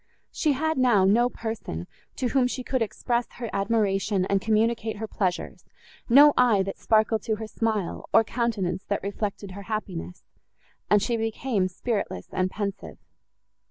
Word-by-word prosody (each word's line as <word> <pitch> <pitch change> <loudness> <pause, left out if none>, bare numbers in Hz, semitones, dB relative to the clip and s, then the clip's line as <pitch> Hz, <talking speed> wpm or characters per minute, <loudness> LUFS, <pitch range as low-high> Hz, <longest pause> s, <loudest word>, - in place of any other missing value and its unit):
She 305 -3 +1
had 315 +1 -1
now 235 -7 +4
no 235 +5 +4
person, 220 - -5 0.3
to 250 - -1
whom 260 -1 +3
she 255 0 -4
could 260 0 -1
express 235 +2 -1
her 235 -2 -6
admiration 195 -2 +1
and 195 0 +1
communicate 225 0 +1
her 220 - -4
pleasures, 190 -4 -3 0.5
no 285 +4 +8
eye, 230 -6 +4
that 195 - -6
sparkled 220 0 +2
to 220 - -1
her 220 +1 -6
smile, 215 -4 -2
or 225 - +6
countenance, 210 -6 -2
that 200 - -2
reflected 200 -1 -4
her 200 +2 -8
happiness; 185 -4 -5 0.7
and 210 -1 +4
she 235 +2 0
became 225 -2 -1
spiritless 195 - -3
and 185 0 0
pensive. 200 0 -5
215 Hz, 155 wpm, -26 LUFS, 195-235 Hz, 0.7 s, no